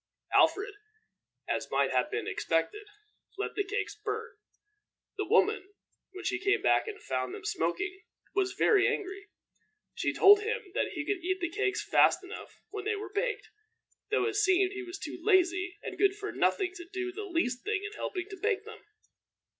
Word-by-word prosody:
Alfred, 405 0 +4 0.7
as - - -2
might - - +2
have - - +2
been 435 +1 -2
expected, 420 0 -1 0.5
let 410 - -2
the 410 - 0
cakes 405 +1 -2
burn. 455 +2 -4 0.9
The - - -2
woman, 395 +2 +2 0.4
when 380 0 -9
she 355 -2 0
came 405 +1 +1
back - - +3
and 425 -1 -6
found 380 - -2
them 415 -1 -10
smoking, 410 -3 -1 0.3
was 385 -1 +1
very 400 0 +4
angry. 395 +1 -3 0.6
She - - 0
told 410 +1 +7
him 435 -2 -3
that - - -1
he - - -3
could 395 -4 -2
eat 375 +1 0
the 345 -1 -2
cakes 410 +1 -1
fast - - +5
enough 380 +4 -10
when 410 -1 -5
they 435 0 +1
were 415 -1 -7
baked, 470 +5 -1 0.6
though 430 - +2
it 425 -2 -1
seemed 380 -2 +4
he 395 - -5
was 360 +1 -7
too - - -7
lazy 365 -2 +2
and - - -6
good 395 -1 +4
for 415 0 -5
nothing 375 -3 +1
to 345 - -8
do 370 -1 -3
the 415 +3 -6
least 330 -10 -1
thing 415 0 -1
in 415 - -4
helping 365 -3 -4
to 390 - -8
bake 425 0 0
them. 440 -1 -11
400 Hz, 180 wpm, -30 LUFS, 375-420 Hz, 0.9 s, told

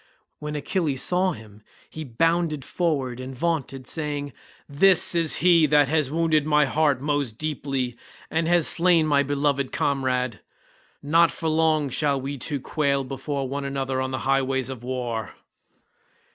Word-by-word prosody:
When 150 0 -5
Achilles 150 -2 -1
saw 185 0 +2
him 110 -3 -14 0.3
he 155 - -8
bounded 155 +2 0
forward 140 -8 -2
and 130 +1 -7
vaunted 135 -3 -2
saying, 145 -2 -3 0.3
"This 180 +7 +3
is 165 -2 +2
he 170 -3 +6
that 145 -1 +4
has 155 -3 +1
wounded 160 -1 +1
my 150 -1 +3
heart 145 -1 +1
most 145 -6 -2
deeply 135 -5 -3 0.4
and 160 0 0
has 170 -2 +3
slain 170 -2 +4
my 145 -2 +3
beloved 140 -1 -1
comrade. 130 -4 -1 0.6
Not 165 +3 +4
for 160 - -3
long 155 -2 +2
shall 140 0 0
we 135 +1 -5
two 145 +3 -2
quail 140 0 -1
before 135 +1 -4
one 140 +2 -4
another 135 -1 -2
on 130 - -2
the 130 - -3
highways 135 -1 0
of 130 -3 -8
war." 120 -3 -4
145 Hz, 150 wpm, -24 LUFS, 130-155 Hz, 0.6 s, he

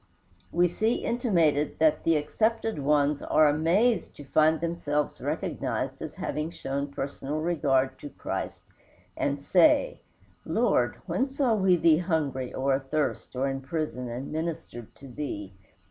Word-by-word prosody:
We 175 +1 +3
see 220 +7 0
intimated 170 - +1
that 155 -1 +3
the 165 - +3
accepted 220 +7 0
ones 145 0 +2
are 155 - +4
amazed 175 +10 +2
to 145 - -10
find 155 +3 +3
themselves 150 -3 -2
recognized - - -3
as - - -6
having 150 +1 -3
shown 140 -3 -3
personal 140 +1 -4
regard 135 -5 +1
to 145 - -8
Christ, - - -5 0.5
and 140 0 -1
say, 300 - +3 0.4
"Lord, - - +1
when 265 +1 0
saw 270 -3 +1
we 190 -4 +4
thee 165 -2 +4
hungry 145 -7 -1
or 135 +1 0
athirst 135 +1 -2
or 130 +2 0
in 135 0 -3
prison 135 -3 -3
and 125 +4 -5
ministered 160 -7 -5
to 140 - -13
thee?" 115 -7 -5
150 Hz, 140 wpm, -27 LUFS, 140-175 Hz, 0.5 s, are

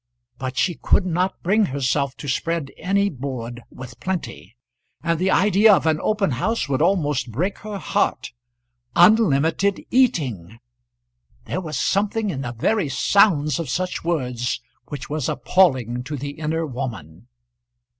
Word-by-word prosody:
But 130 0 -4
she 180 - +2
could 190 - +3
not 180 +2 -1
bring 210 +4 +3
herself 140 0 -1
to 145 - -8
spread 160 +2 -2
any 200 +3 +1
board 125 -6 -5
with 125 -2 -11
plenty, 120 - -5 0.5
and 165 -1 0
the 185 +1 +1
idea 205 +3 +5
of - - -2
an 155 -1 +2
open 210 -6 +1
house 215 - -1
would 140 0 0
almost 150 -8 +1
break 180 - -2
her 210 -1 -6
heart. - - -1 0.6
Unlimited 180 -1 +4
eating! 130 - +1 0.9
There 185 - -3
was 155 -4 -4
something 210 +1 0
in 135 -5 -4
the 120 -3 -4
very 165 - 0
sounds 155 -1 +3
of 165 -6 -4
such 180 +6 -2
words 125 -8 -1 0.3
which 145 -3 -7
was 150 -2 -2
appalling 130 - +2
to 145 +2 -4
the 140 +2 -5
inner 160 +2 -2
woman. 120 - -7
155 Hz, 145 wpm, -22 LUFS, 130-190 Hz, 0.9 s, idea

